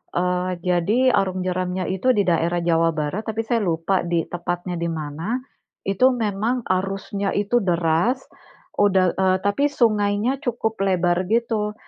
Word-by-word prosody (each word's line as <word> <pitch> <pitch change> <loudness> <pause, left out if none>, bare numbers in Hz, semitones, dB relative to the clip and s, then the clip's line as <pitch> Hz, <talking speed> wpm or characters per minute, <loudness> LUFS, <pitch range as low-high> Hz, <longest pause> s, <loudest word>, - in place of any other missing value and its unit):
eee, 180 +1 0
jadi 200 +9 +2
arung 185 -3 0
jeramnya 185 0 -2
itu 220 +8 +2
di 205 - +3
daerah 170 0 +1
Jawa 165 -1 +2
Barat, 155 +8 -3
tapi 220 0 -1
saya 235 -1 +2
lupa 170 +1 0
di 170 -2 +1
tepatnya 175 0 -3
di 170 - -1
mana, 160 +7 -3 0.5
itu 255 +7 +3
memang 225 +2 -1
arusnya 195 +1 -1
itu 205 +4 +1
deras, 175 +8 +1 0.6
udah, 190 -3 +3
eee, 185 0 +3
tapi 205 +8 +1
sungainya 215 0 +1
cukup 225 -3 -2
lebar 180 -1 +1
gitu, 220 -1 0
190 Hz, 140 wpm, -22 LUFS, 175-215 Hz, 0.6 s, di